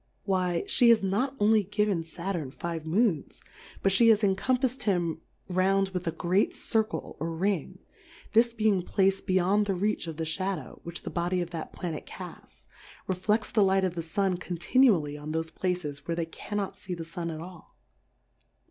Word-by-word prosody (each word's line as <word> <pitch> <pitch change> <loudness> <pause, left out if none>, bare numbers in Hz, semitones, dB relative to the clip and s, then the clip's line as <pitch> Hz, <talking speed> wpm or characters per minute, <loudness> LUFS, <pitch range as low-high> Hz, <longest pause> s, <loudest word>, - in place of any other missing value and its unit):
Why, 185 -3 0
fhe 240 - +4
has 230 -3 +5
not 245 +9 0
only 215 +1 +5
given 205 -2 0
Saturn 170 -2 -4
five 165 +3 -5
Moons, 185 - +1 0.4
but 195 - +3
ihe 230 - +7
has 215 -1 +5
encompafs'd 250 +6 +1
him 175 -5 0 0.3
round 195 +1 +2
with 180 -2 -4
a - - +2
great 180 +4 +1
Circle 220 -1 -1
or 165 - -2
Ring; 190 +5 -1 0.6
this 235 +2 +5
be 220 -1 +1
ing 195 -4 +3
placed 195 +2 +1
beyond 190 +3 +3
the 195 - +1
reach 205 -1 -1
of 160 -2 -6
the 165 - -2
Sha 190 +4 0
dow, - - -10
which 170 0 -7
the - - -5
Body 175 +1 0
of 175 -1 -3
that 165 -2 -5
Planet 165 -4 -5
cafts, - - -10 0.4
refleftsthe 210 +3 +1
Light 190 0 +3
of 185 -2 0
the 170 - -3
Sun 185 +2 0
conr 175 0 -5
tinually 175 - +3
on 155 +1 -5
thofe 160 0 -2
Places 175 -6 -3
where 170 - 0
they 170 -1 -1
cannot 200 +4 -4
fee 180 - -6
the 165 -1 -6
Sun 170 +1 -4
at 160 -1 -5
all. 175 0 -11
185 Hz, 185 wpm, -28 LUFS, 170-205 Hz, 0.6 s, ihe